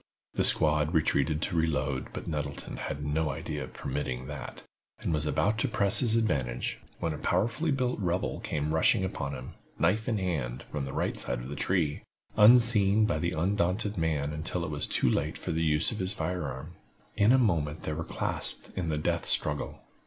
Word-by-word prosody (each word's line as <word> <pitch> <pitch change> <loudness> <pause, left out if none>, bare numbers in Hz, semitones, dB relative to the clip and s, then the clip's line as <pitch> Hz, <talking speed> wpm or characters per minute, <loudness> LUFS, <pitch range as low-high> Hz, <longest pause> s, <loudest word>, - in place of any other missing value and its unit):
The - - +1
squad 75 +1 +3
retreated 75 0 +1
to - - -2
reload, 75 -5 0
but - - -7
Nettleton 75 -3 -4
had 75 +1 -4
no 75 +1 0
idea 75 +1 -4
of 65 - -15
permitting 65 -2 -4
that, 75 0 -7 0.3
and - - -2
was 75 0 0
about 80 +10 +1
to - - +2
press 100 +2 +4
his 115 -3 +4
advantage, 65 - -1 0.2
when 80 - -2
a 75 - -7
powerfully 115 - 0
built 130 -4 0
rebel 90 -2 -1
came 75 +1 -2
rushing 110 +5 +3
upon 70 -6 -3
him, 65 0 -8 0.3
knife 110 +2 +1
in 110 - +1
hand, 75 -10 -2
from 75 -2 -4
the 70 - -6
right - - -1
side 60 - 0
of - - -7
the 70 - -5
tree, 80 -4 0 0.3
unseen 110 -2 +6
by 105 - 0
the 85 +1 -1
undaunted 100 +4 0
man 75 -3 -1
until 85 +3 -3
it - - -5
was 75 - -1
too - - +1
late - - 0
for - - -4
the 80 +1 -1
use 75 -1 +3
of 110 - -5
his 95 +2 0
fire 90 -1 -2
arm. 75 +6 -7 0.4
In 105 +3 +4
a 130 - +6
moment 80 - +1
they 80 - -2
were 80 +2 -3
clasped - - -4
in 85 -3 -2
the 75 - 0
death 75 - -1
struggle. 75 -1 +1
80 Hz, 195 wpm, -29 LUFS, 75-100 Hz, 0.4 s, unseen